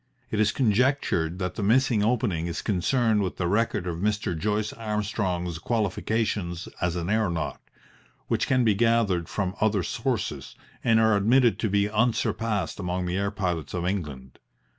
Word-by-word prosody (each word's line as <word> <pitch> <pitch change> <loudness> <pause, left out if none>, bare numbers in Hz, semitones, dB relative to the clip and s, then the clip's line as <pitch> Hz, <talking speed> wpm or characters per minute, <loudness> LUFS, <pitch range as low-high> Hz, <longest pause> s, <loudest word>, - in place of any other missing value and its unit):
It 110 - -1
is 105 -1 +3
conjectured 110 - +1
that 90 -1 -3
the 105 - -5
missing 115 +1 +3
opening 105 -7 0
is 85 - -4
concerned 110 +3 +1
with 95 -2 -3
the 90 - -1
record 105 -1 0
of 85 -2 -3
Mr. 105 -1 -1
Joyce 105 +5 -1
Armstrong's 100 -6 -2
qualifications 105 -3 -1
as 90 -1 0
an 85 -1 -3
aeronaut, 95 -6 -1 0.7
which - - 0
can 130 -2 +3
be 110 -3 +4
gathered 105 -6 +2
from 95 -2 -2
other 105 -3 +2
sources - - -3 0.3
and 115 -1 +4
are 110 -1 +4
admitted 115 0 +3
to 110 - 0
be 100 +1 +2
unsurpassed 110 -3 0
among 90 -1 -2
the 90 0 -2
air 100 0 0
pilots 90 -7 -3
of 85 -1 -2
England. 75 -9 -4
100 Hz, 160 wpm, -26 LUFS, 90-110 Hz, 0.7 s, be